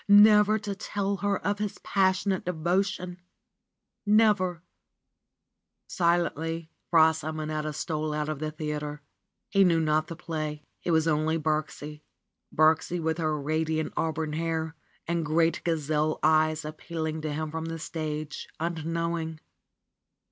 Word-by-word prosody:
Never 210 +1 +7
to 205 -1 -4
tell 200 0 -2
her 200 0 0
of 205 +1 0
his 210 -1 -3
passionate 190 0 +1
devotion! 180 +1 -1 0.8
Never 205 -5 +3 1.2
Silently 165 -2 0 0.2
Fra 160 -1 +6
Simonetta 155 -1 -3
stole 155 0 -2
out 150 0 -1
of 155 -2 -3
the 155 0 -2
theater. 150 -1 -4 0.5
He 195 0 +5
knew 170 -3 +4
not 155 0 +2
the 165 - -6
play. 155 -3 -4 0.2
It - - -3
was 160 -1 +3
only 155 +1 +2
Birksie, 155 -1 -2 0.5
Birksie 160 +3 +3
with 160 0 -1
her 155 -2 0
radiant 155 +2 -1
auburn 160 -1 -1
hair 160 0 -2 0.3
and 170 0 0
great 165 +2 +2
gazelle 155 -2 0
eyes 155 0 +3
appeal 160 +1 -5
ing 155 0 -3
to 155 -1 -3
him 155 +1 -3
from 160 0 -4
the 165 0 -4
stage, 155 -1 -4
unknowing. 165 0 -2
160 Hz, 130 wpm, -28 LUFS, 155-175 Hz, 1.2 s, Never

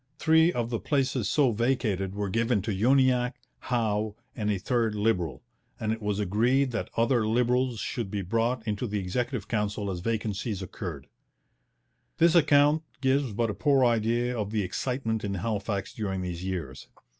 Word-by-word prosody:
Three 160 +2 +4
of 120 -6 -2
the 115 - -1
places 130 -6 0
so 140 -5 +3
vacated 105 -5 0
were 100 0 -2
given 115 -2 +1
to 110 - -2
Uniacke, 125 +3 +3 0.2
Howe, 110 -4 -1 0.2
and 105 -3 -2
a 105 - +1
third 110 +2 0
Liberal, 105 -7 0 0.4
and 110 0 0
it 110 - -6
was 105 -1 -1
agreed 120 +7 +2
that 115 - -3
other 115 -1 +2
Liberals 125 +1 +1
should 115 -2 -3
be 100 0 -3
brought 115 +4 -1
into 105 +3 -1
the 105 0 -2
Executive 115 +4 -2
Council 105 -2 -1
as 90 - -4
vacancies 105 -1 -2
occurred. 85 -7 -6 1.1
This 170 0 +5
account 150 -2 +5 0.2
gives 135 -1 +1
but 115 +1 0
a - - -4
poor 135 +1 +3
idea 120 +1 +1
of 105 -3 -2
the 105 -1 0
excitement 115 +3 -2
in 100 -1 -2
Halifax 100 0 -2
during 95 -4 -3
these 90 -1 -5
years. 85 -8 -5
115 Hz, 165 wpm, -27 LUFS, 100-125 Hz, 1.1 s, This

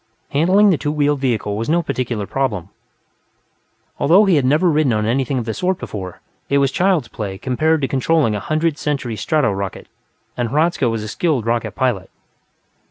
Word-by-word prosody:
Handling 190 +8 +4
the 165 - +1
two 145 - -1
wheeled 145 -1 +1
vehicle 115 -6 -1
was 115 +5 -3
no 170 +2 +2
particular 125 -7 -3
problem; 105 -8 -2 1.3
although 185 +8 +5
he 190 -4 +3
had 140 -4 +2
never 150 +7 +3
ridden 150 -6 +2
on 105 0 0
anything 130 +4 0
of 120 - -2
the 110 - -3
sort 185 - -1
before, 95 -4 -7 0.3
it 140 - +3
was 140 -1 +2
child's 180 -8 +1
play 100 -4 -6
compared 155 +8 0
to 135 - 0
controlling 135 -2 +1
a 105 - -2
Hundredth 155 +5 -1
Century 140 -6 -2
strato 125 +4 +1
rocket, 100 -1 -5 0.5
and 120 -2 -2
Hradzka 150 -2 +1
was 115 -2 -3
a - - -5
skilled 140 -1 -1
rocket 115 0 -1
pilot. 120 -8 -1
135 Hz, 180 wpm, -19 LUFS, 115-155 Hz, 1.3 s, although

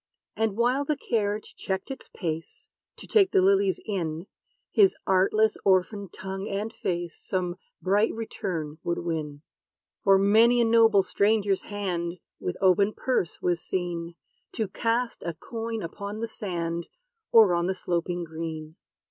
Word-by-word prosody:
And 220 -2 0
while 250 +4 +2
the 295 0 -1
carriage 210 -5 -1
checked 190 +7 -3
its 265 - -8
pace, 165 -2 -5 0.3
To - - -10
take 395 -4 +4
the 390 - +3
lilies 390 -1 +3
in, 170 -5 -3 0.5
His 395 -3 +5
artless 205 +3 +3
orphan 195 +1 +2
tongue 190 +3 -6
and 205 +3 -3
face 175 -2 -3
Some 180 -2 -2 0.3
bright 205 +4 +3
return 170 -8 -4
would 170 - -1
win. 155 -4 -4 0.6
For 195 -1 +6
many 220 +5 +5
a 235 - +4
noble 225 -3 +5
stranger's 200 -1 +2
hand, 180 -5 -2 0.3
With 180 - -3
open 195 +2 +4
purse, 250 -10 -1
was 175 -1 +1
seen, 175 -2 -3 0.4
To 220 - -1
cast 230 +4 -1
a 170 -1 -4
coin 225 - -5
upon 200 +5 -6
the 230 - -2
sand, 170 -6 -4 0.4
Or 220 -5 +7
on 170 0 +1
the 190 - 0
sloping 175 -1 -2
green. 160 -1 -6
195 Hz, 145 wpm, -27 LUFS, 170-225 Hz, 0.6 s, Or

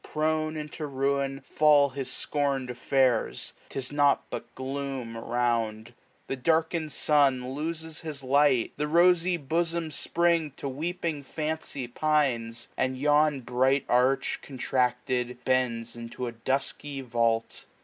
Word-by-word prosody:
Prone 155 0 -1
into 150 0 -5
niin, 135 0 -1
fall 145 -1 +4
his 130 -1 -4
scorn'd 140 -4 -1
affairs. 125 -1 +1
1005 - - -29
'Tis 135 0 -4
nought 145 -1 +3
but - - -7
gloom 135 -3 -4
around: 115 -1 -1 0.3
The - - -3
darkened 160 +3 +1
sun 135 -4 +2
Loses 160 +1 -4
his 150 -4 -6
light: 135 -2 +3
The 150 +1 -1
rosy 175 +2 +4
bosom'd 165 +2 -1
Spring 165 0 +1
To - - -4
weeping 160 +2 -3
fancy 150 -2 -4
pines; 120 -5 0
and 130 0 0
yon 145 0 +3
bright 130 +3 +1
arch. 125 +2 +2
Contracted, 125 -2 -1
bends 120 -3 0
into 120 +1 -6
a 120 - -3
dusky 135 +3 -3
vault. 115 -2 -1
135 Hz, 125 wpm, -28 LUFS, 125-155 Hz, 0.3 s, fall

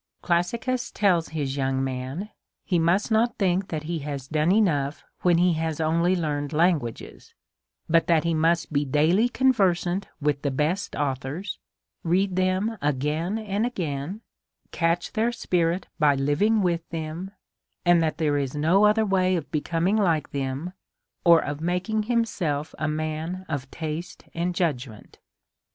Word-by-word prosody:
Classicus 235 +9 0
tells 180 -6 +2
his 145 -4 -3
young' 135 -1 0
man, 135 +10 -4 0.3
he 180 -3 +1
must 175 +7 +2
not 230 +2 +2
think 190 -1 +1
that 155 -2 -4
he 165 +1 -3
has 140 -2 -5
done 155 +3 +1
enough 155 -9 +1 0.2
when 175 -2 +4
he 175 0 +4
has 160 -1 -2
only 170 +3 +2
learned 150 -4 -2
languages, 155 -7 -1 0.5
but 165 0 +3
that 165 -2 +3
he 170 0 +1
must 165 +1 +1
be 145 0 +2
daily 160 - +3
conversant 195 -8 +2
with 145 -2 0
the 140 - 0
best 150 +8 -1
authors, 145 +7 -3 0.4
read 185 +3 +1
them 185 +4 0
again 150 +7 -1
and 210 -1 -2
again, 175 - -3 0.5
catch 165 +1 0
their 225 +2 +1
spirit 175 -5 0
by 150 -2 +4
living* 170 +11 +2
with 170 -2 +1
them, 165 +3 -5 0.6
and 175 -1 +5
that 160 -1 0
there 150 -3 +1
is 135 0 -3
no 170 +8 +4
other 215 +1 +4
way 185 -2 +2
of 165 -4 -4
becoming 170 +6 0
like 165 -8 +1
them, 140 +5 -3 0.5
or 170 -2 +6
of 145 +1 -4
making 180 +6 0
him 235 -1 +3
self 150 -8 -3
a 155 - 0
man 155 +4 -3
of 140 -3 -4
taste 160 +3 -6
and 175 +1 -2
judgment. 130 - -3
165 Hz, 150 wpm, -25 LUFS, 150-185 Hz, 0.6 s, or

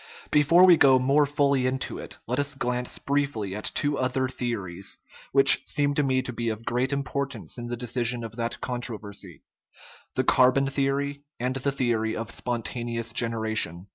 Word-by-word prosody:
But - - -27
before 160 +5 +6
we 175 -3 +7
go 135 -3 +6
more 140 +3 +3
fully 140 -2 +2
into 130 +1 -3
it, - - -8
let 125 +4 -2
us 145 0 -1
glance 125 -1 -2
briefly 140 -9 -2
at 105 - -4
two 145 -1 0
other 130 0 0
theories, 100 -8 -4 0.3
which 135 0 +7
seem 145 0 +1
to 150 - +1
me 130 -2 +1
to 125 - -5
be 115 0 -2
of 110 +1 -5
great 125 +3 0
importance 140 -2 -3
in 120 - -6
the 120 0 -4
decision 120 0 0
of 115 -1 -8
that 115 0 -3
controversy 105 - -5 0.7
the - - +1
carbon 130 +2 +4
theory 140 +1 -1 0.2
and 125 +2 -1
the 140 +2 0
theory 115 -5 -1
of 115 0 -4
spontaneous 115 -1 -3
generation. 110 -6 -1
125 Hz, 170 wpm, -26 LUFS, 115-140 Hz, 0.7 s, we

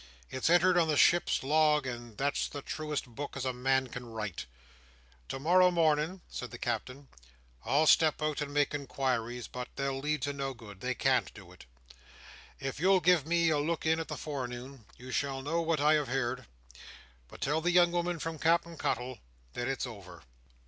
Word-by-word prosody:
It's 130 +4 0
entered 175 +1 +5
on 165 - +3
the 155 -2 +1
ship's 175 -2 +4
log, 150 0 +3
and 120 -3 -6
that's 140 +1 0
the 145 -1 -7
truest 150 -2 -3
book 135 +4 -7
as 135 - -3
a 130 - 0
man 130 +1 +1
can 125 -1 -7
write. 105 - -5 0.8
To - - -3
morrow 180 +5 +5
morning," 165 +1 +1
said 125 - -6
the - - -9
Captain, 125 +4 -4 0.6
"I'll 140 +6 +3
step 155 0 +5
out 155 -1 -1
and 145 -1 -3
make 145 0 +1
inquiries; 125 -5 -2
but 125 0 -6
they'll 135 -1 -2
lead 150 0 -1
to 145 0 -1
no 135 -1 -4
good. 105 -5 -12
They 130 0 -2
can't - - +1
do - - -13
it. - - -15 0.9
If 135 0 -4
you'll 190 +3 +4
give 175 -5 +3
me 170 -1 +3
a 150 - +2
look 160 +3 -2
in 160 +1 +3
in 165 - -4
the - - -5
forenoon, 130 -3 -6
you 125 +1 -10
shall 135 0 -1
know 165 +4 0
what 165 -2 0
I 150 +2 +4
have 150 -2 +1
heerd; 125 -1 -2 0.8
but - - -13
tell 150 +3 0
the 175 - +1
young 175 -1 +5
woman 175 0 -1
from 160 0 -5
Cap'en 170 +1 +1
Cuttle, 125 -1 -2 0.3
that 120 - -3
it's 135 0 -2
over. 110 -5 -10
140 Hz, 190 wpm, -31 LUFS, 125-160 Hz, 0.9 s, entered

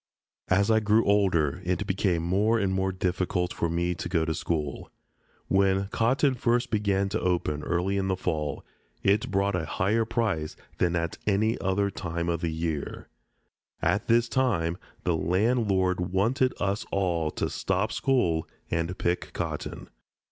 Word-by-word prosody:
As 100 +4 +3
I 110 - +5
grew 110 +1 +3
older 90 -6 +2
it 90 +2 -1
became 95 -3 0
more 100 +6 +2
and 100 -3 0
more 95 0 0
difficult 90 -1 -1
for 85 - -1
me 85 +1 0
to 85 - -5
go 85 -3 +1
to 80 - -1
school. 75 -3 -3 0.6
When 95 0 +2
cotton 130 +6 +2
first 120 0 0
began 100 -2 +1
to 110 +3 -1
open, 85 -5 0
early 90 +4 0
in 95 -1 0
the 95 - +1
fall, 75 -5 -3 0.4
it 100 +2 +2
brought 100 0 +1
a 80 -3 -1
higher 105 +5 +1
price 110 -9 -1 0.2
than 90 -1 +2
at 85 -1 -2
any 110 +3 +2
other 100 +1 +1
time 85 -1 -3
of 85 -1 -1
the 85 - -1
year. 80 -2 -4 0.7
At - - 0
this 120 +1 +4
time 100 -10 0 0.2
the 90 -2 +1
landlord 95 +1 +1
wanted 110 +9 +1
us 100 +3 0
all 85 -5 0
to - - -1
stop - - -1
school 85 -12 +1 0.2
and 85 +2 -1
pick 85 +1 -1
cotton. - - -4
95 Hz, 155 wpm, -27 LUFS, 85-105 Hz, 0.7 s, I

